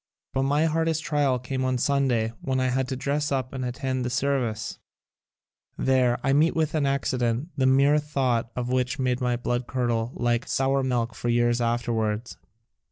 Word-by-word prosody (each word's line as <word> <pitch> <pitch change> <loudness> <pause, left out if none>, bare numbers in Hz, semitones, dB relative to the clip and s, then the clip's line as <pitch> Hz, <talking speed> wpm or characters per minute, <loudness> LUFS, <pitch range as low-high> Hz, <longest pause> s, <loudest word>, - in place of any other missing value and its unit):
But 135 - +1
my 145 +4 +2
hardest 160 0 0
trial 145 -4 +1
came 130 +1 -3
on 130 -1 +1
Sunday 125 -4 +1
when 130 -1 -1
I 130 0 +1
had 130 +1 0
to 130 - -3
dress 140 +3 -1
up 130 -2 -1
and 130 -1 -4
attend 130 +1 -2
the 125 - -1
service. 120 -4 -1 1.0
There 130 -2 +2
I 135 - +2
met 155 +4 +3
with 160 -2 0
an 150 -3 +1
accident, 130 0 0
the 130 -2 +2
mere 140 +3 +4
thought 130 -6 0
of 125 -1 -3
which 125 +1 0
made 125 -1 0
my 125 -1 +1
blood 120 0 -2
curdle 120 -2 -1
like 120 0 0
sour 135 +1 +1
milk 120 -3 -1
for 120 - -3
years 120 0 +2
afterwards. 115 -1 -1
130 Hz, 175 wpm, -25 LUFS, 120-140 Hz, 1.0 s, mere